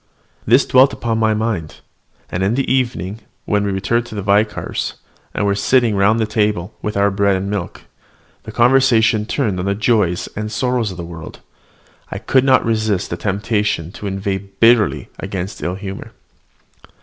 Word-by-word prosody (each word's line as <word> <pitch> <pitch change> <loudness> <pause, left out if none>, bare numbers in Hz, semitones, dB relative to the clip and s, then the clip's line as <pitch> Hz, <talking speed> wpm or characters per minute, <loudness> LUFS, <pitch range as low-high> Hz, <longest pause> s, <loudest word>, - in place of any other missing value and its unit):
This 125 +5 +5
thought - - -20
dwelt 130 +2 +6
upon 115 -1 -2
my 110 -1 +2
mind; 105 -8 -3 0.5
and 85 - -2
in 100 +5 +1
the 135 - 0
evening, 115 -6 -1 0.3
when 105 -1 +1
we 100 - -1
returned 110 +5 0
to 110 - -9
the 100 - -4
vicar's, 105 +2 0 0.4
and 105 - -1
were 100 - +2
sitting 115 +2 +2
round 100 +3 +3
the 110 - +2
table 105 -3 -1
with 105 -1 -3
our 100 0 +3
bread 100 0 +2
end 95 +2 -3
milk, 95 -4 -4 0.6
the 110 - -9
conversation 120 -3 +3
turned 110 -11 -1
on 90 - -2
the 100 - +1
joys 105 -5 +1
and 105 0 -4
sorrows 125 -1 0
of 90 - -8
the 85 - -6
world, 85 -2 -10 0.7
I - - -5
could 125 +5 +2
not 130 -1 +4
resist 110 -4 0
the - - -1
temptation 100 -2 -1
to 100 - -7
inveigh 95 0 -2
bitterly 105 +2 +2
against 95 0 -5
ill 90 - -2
humour. 95 0 -8
105 Hz, 175 wpm, -18 LUFS, 95-115 Hz, 0.7 s, dwelt